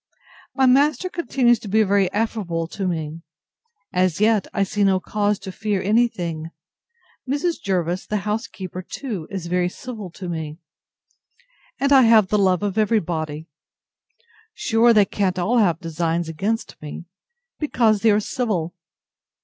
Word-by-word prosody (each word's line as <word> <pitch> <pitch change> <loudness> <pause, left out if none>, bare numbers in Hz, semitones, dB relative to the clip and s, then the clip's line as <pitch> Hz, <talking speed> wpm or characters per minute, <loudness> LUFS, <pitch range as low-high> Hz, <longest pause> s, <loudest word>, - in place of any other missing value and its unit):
My 265 - +3
master 285 +6 +3
continues 250 -8 +2
to 215 - -9
be 215 +2 +3
very 195 -2 +2
affable 205 -6 -1
to 195 0 -3
me. 160 -2 -3 0.7
As 180 -2 +1
yet 215 -2 +3
I 200 - +1
see 205 +1 -1
no 190 -1 +3
cause 205 +2 0
to 195 -1 -8
fear 205 +1 -2
any 220 +6 +3
thing. 165 -7 -5 0.8
Mrs. 320 +5 -1
Jervis, 180 -1 -1
the 210 - -1
housekeeper, 205 -4 -4
too, 195 - -6
is 190 -3 -5
very 180 +1 0
civil 215 -2 -8
to 185 - -7
me, 160 -3 -5 1.2
and 280 +1 +3
I 270 - +8
have 225 -5 +5
the 210 - +2
love 185 -1 +2
of 205 +1 -1
every 220 +1 +3
body. 155 -3 -4 1.1
Sure 230 +1 +3
they 210 -3 +5
can't 190 -2 -1
all 220 +7 +2
have 175 -7 +2
designs 165 0 -2
against 200 +8 -3
me, 150 +3 -8 0.5
because 230 -8 +2
they 230 - +4
are 210 0 +4
civil! 200 -7 -2
200 Hz, 150 wpm, -22 LUFS, 175-225 Hz, 1.2 s, I